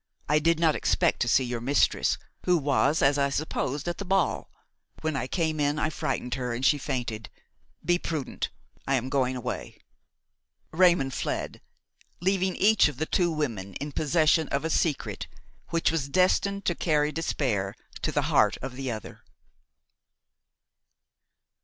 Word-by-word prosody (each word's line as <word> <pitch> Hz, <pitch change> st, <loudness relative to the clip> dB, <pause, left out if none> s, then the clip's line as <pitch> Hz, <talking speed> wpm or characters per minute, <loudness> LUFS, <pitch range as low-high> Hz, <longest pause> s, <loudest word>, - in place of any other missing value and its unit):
I 150 Hz, +1 st, +3 dB
did 165 Hz, +1 st, +2 dB
not 160 Hz, -2 st, +4 dB
expect -, -, +1 dB
to 120 Hz, -, +1 dB
see 130 Hz, +3 st, +4 dB
your 120 Hz, -2 st, -3 dB
mistress, 140 Hz, +4 st, +2 dB, 0.3 s
who 180 Hz, -1 st, +4 dB
was, 145 Hz, +1 st, +2 dB
as 140 Hz, +1 st, +4 dB
I 140 Hz, 0 st, +2 dB
supposed, 145 Hz, 0 st, -2 dB
at 175 Hz, -, -3 dB
the -, -, -3 dB
ball. 195 Hz, -2 st, 0 dB, 0.5 s
When 155 Hz, -1 st, -1 dB
I 130 Hz, -1 st, -2 dB
came 160 Hz, -1 st, -1 dB
in 145 Hz, 0 st, +1 dB
I 155 Hz, -, 0 dB
frightened 125 Hz, -4 st, -3 dB
her 125 Hz, -2 st, -2 dB
and 125 Hz, +3 st, -2 dB
she 145 Hz, -, +4 dB
fainted. 115 Hz, -5 st, -4 dB, 0.6 s
Be 175 Hz, +2 st, +3 dB
prudent; 155 Hz, -7 st, -3 dB, 0.4 s
I 135 Hz, -, +3 dB
am 130 Hz, 0 st, -1 dB
going 130 Hz, -2 st, +1 dB
away." 125 Hz, -, -5 dB, 0.9 s
Raymon 170 Hz, -5 st, +4 dB
fled, -, -, -3 dB, 0.6 s
leaving 190 Hz, +1 st, +1 dB
each 215 Hz, +2 st, +5 dB
of 150 Hz, -, -6 dB
the 155 Hz, -, -1 dB
two 175 Hz, +2 st, +1 dB
women 115 Hz, -, -3 dB
in 145 Hz, +1 st, -5 dB
possession 155 Hz, +2 st, +2 dB
of 140 Hz, +3 st, -2 dB
a 160 Hz, -, -1 dB
secret 150 Hz, -3 st, -1 dB, 0.4 s
which 165 Hz, -1 st, +1 dB
was 145 Hz, -4 st, -2 dB
destined 195 Hz, +4 st, +2 dB
to 175 Hz, -, +2 dB
carry 150 Hz, -3 st, +1 dB
despair 120 Hz, -11 st, -1 dB, 0.3 s
to -, -, -1 dB
the -, -, 0 dB
heart -, -, +3 dB
of 130 Hz, -1 st, -6 dB
the 135 Hz, 0 st, -4 dB
other. 110 Hz, -2 st, -7 dB
150 Hz, 160 wpm, -27 LUFS, 130-165 Hz, 0.9 s, each